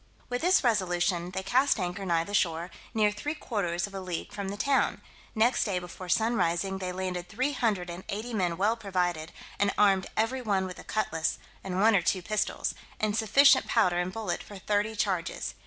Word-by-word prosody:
With 245 Hz, 0 st, -2 dB
this 360 Hz, -1 st, +4 dB
resolution 180 Hz, -5 st, +1 dB
they 190 Hz, +1 st, -4 dB
cast 250 Hz, +5 st, +3 dB
anchor 180 Hz, +1 st, -3 dB
nigh 165 Hz, -2 st, +2 dB
the 200 Hz, -, -8 dB
shore, 170 Hz, -2 st, +1 dB, 0.2 s
near 210 Hz, -1 st, +4 dB
three 290 Hz, +9 st, -4 dB
quarters 175 Hz, -, -2 dB
of 200 Hz, -, -11 dB
a 195 Hz, -, -4 dB
league 180 Hz, -3 st, -5 dB
from 200 Hz, -1 st, -4 dB
the 200 Hz, -, -5 dB
town: 275 Hz, +5 st, +1 dB, 0.4 s
next 230 Hz, +3 st, +3 dB
day 200 Hz, -4 st, -1 dB
before 180 Hz, +1 st, -7 dB
sun 225 Hz, +6 st, +2 dB
rising, 190 Hz, 0 st, 0 dB
they 185 Hz, -1 st, -3 dB
landed 180 Hz, -1 st, -4 dB
three 260 Hz, +7 st, 0 dB
hundred 210 Hz, -9 st, 0 dB
and 175 Hz, +2 st, -8 dB
eighty 220 Hz, +4 st, -4 dB
men 180 Hz, -5 st, 0 dB
well 210 Hz, +4 st, +2 dB
provided, 180 Hz, -7 st, -2 dB, 0.3 s
and 200 Hz, 0 st, +3 dB
armed 195 Hz, -2 st, +4 dB
every 240 Hz, +4 st, +1 dB
one 200 Hz, -5 st, 0 dB
with 180 Hz, -1 st, -7 dB
a -, -, -9 dB
cutlass, 165 Hz, -7 st, -1 dB, 0.3 s
and 185 Hz, -1 st, -3 dB
one 220 Hz, +2 st, +5 dB
or 195 Hz, -, +4 dB
two 180 Hz, +2 st, 0 dB
pistols, 215 Hz, +3 st, -1 dB, 0.3 s
and 215 Hz, -1 st, 0 dB
sufficient 265 Hz, +5 st, +5 dB
powder 180 Hz, -7 st, +3 dB
and 180 Hz, +1 st, -1 dB
bullet 210 Hz, -3 st, -3 dB
for 205 Hz, -, -10 dB
thirty 210 Hz, +3 st, 0 dB
charges. 190 Hz, -6 st, -1 dB
195 Hz, 200 wpm, -28 LUFS, 180-220 Hz, 0.4 s, one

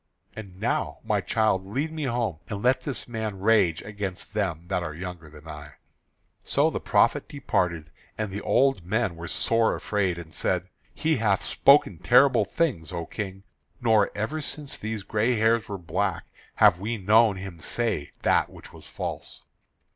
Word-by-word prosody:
And 95 Hz, -4 st, -10 dB
now, 115 Hz, +4 st, -1 dB
my 105 Hz, -3 st, 0 dB
child, 105 Hz, 0 st, +1 dB
lead 135 Hz, +11 st, -3 dB
me 155 Hz, -2 st, -3 dB
home, 115 Hz, -, -1 dB
and 100 Hz, -1 st, -5 dB
let 130 Hz, +1 st, +3 dB
this 135 Hz, 0 st, -4 dB
man 110 Hz, -4 st, -4 dB
rage 95 Hz, -6 st, +3 dB
against 100 Hz, -3 st, -6 dB
them 90 Hz, -6 st, -2 dB
that 90 Hz, -, -1 dB
are 80 Hz, -3 st, -5 dB
younger 90 Hz, -2 st, -7 dB
than 75 Hz, +1 st, -14 dB
I." 75 Hz, -2 st, -9 dB, 0.7 s
So -, -, +2 dB
the -, -, -3 dB
prophet -, -, +2 dB
departed, 85 Hz, -4 st, -1 dB, 0.3 s
and 110 Hz, -2 st, -3 dB
the 100 Hz, +2 st, -4 dB
old 135 Hz, -7 st, +2 dB
men 105 Hz, 0 st, 0 dB
were 85 Hz, 0 st, -7 dB
sore 115 Hz, +4 st, +2 dB
afraid, 95 Hz, -4 st, -1 dB
and 80 Hz, -2 st, -10 dB
said: 90 Hz, +2 st, -1 dB, 0.3 s
"He 160 Hz, -2 st, +1 dB
hath 105 Hz, -4 st, +1 dB
spoken 140 Hz, -, +4 dB
terrible 125 Hz, -3 st, +5 dB
things, 95 Hz, -, -1 dB
O 85 Hz, -2 st, -4 dB
King; 95 Hz, +1 st, -6 dB, 0.4 s
nor 110 Hz, -4 st, +3 dB
ever 140 Hz, +10 st, -2 dB
since 145 Hz, -1 st, -6 dB
these 110 Hz, -1 st, -5 dB
gray 110 Hz, +5 st, +1 dB
hairs 110 Hz, 0 st, +2 dB
were 100 Hz, -, -3 dB
black 90 Hz, +1 st, -2 dB, 0.3 s
have 90 Hz, -, +5 dB
we 110 Hz, +4 st, -2 dB
known 105 Hz, +2 st, +4 dB
him 95 Hz, -3 st, -8 dB
say 110 Hz, -5 st, -2 dB
that -, -, +3 dB
which -, -, -12 dB
was -, -, -13 dB
false." -, -, -6 dB
105 Hz, 170 wpm, -26 LUFS, 90-115 Hz, 0.7 s, terrible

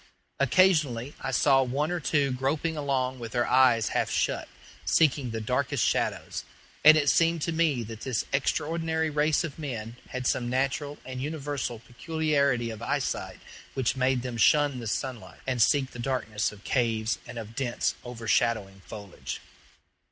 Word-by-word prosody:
Occasionally 140 Hz, -4 st, +3 dB
I -, -, -3 dB
saw 135 Hz, +1 st, +4 dB
one 140 Hz, +5 st, -1 dB
or 175 Hz, -, -1 dB
two 145 Hz, -3 st, +1 dB
groping 145 Hz, +6 st, -1 dB
along 130 Hz, -3 st, -1 dB
with 115 Hz, -2 st, -7 dB
their 120 Hz, -1 st, +2 dB
eyes 125 Hz, -4 st, +4 dB
half -, -, 0 dB
shut, -, -, 0 dB, 0.4 s
seeking 135 Hz, -, +2 dB
the 115 Hz, 0 st, -3 dB
darkest 110 Hz, -, 0 dB
shadows; -, -, -1 dB, 0.4 s
and 155 Hz, +1 st, +9 dB
it 145 Hz, -2 st, +1 dB
seemed 165 Hz, +1 st, +3 dB
to 170 Hz, -, 0 dB
me 160 Hz, -7 st, +1 dB
that 110 Hz, 0 st, -8 dB
this 130 Hz, -4 st, -1 dB
extraordinary 160 Hz, +3 st, 0 dB
race 150 Hz, +2 st, +2 dB
of 160 Hz, -2 st, -6 dB
men 120 Hz, -6 st, -5 dB
had 130 Hz, 0 st, -4 dB
some 120 Hz, 0 st, 0 dB
natural 135 Hz, +3 st, -1 dB
and 130 Hz, -1 st, -6 dB
universal 145 Hz, -4 st, -3 dB
peculiarity 140 Hz, -1 st, 0 dB
of 110 Hz, 0 st, -8 dB
eyesight -, -, -2 dB, 0.3 s
which 130 Hz, -1 st, 0 dB
made 130 Hz, -1 st, +1 dB
them 125 Hz, -2 st, -4 dB
shun 145 Hz, +3 st, +4 dB
the 115 Hz, -, -5 dB
sunlight, 110 Hz, -6 st, -4 dB
and 125 Hz, -3 st, 0 dB
seek 135 Hz, +3 st, +3 dB
the 125 Hz, -, -10 dB
darkness 120 Hz, -5 st, -1 dB
of 105 Hz, -1 st, -14 dB
caves 115 Hz, -3 st, 0 dB
and -, -, -8 dB
of 110 Hz, -1 st, -7 dB
dense, 125 Hz, -3 st, 0 dB
overshadowing 115 Hz, -4 st, 0 dB
foliage. 100 Hz, -3 st, -7 dB
130 Hz, 160 wpm, -27 LUFS, 115-150 Hz, 0.4 s, and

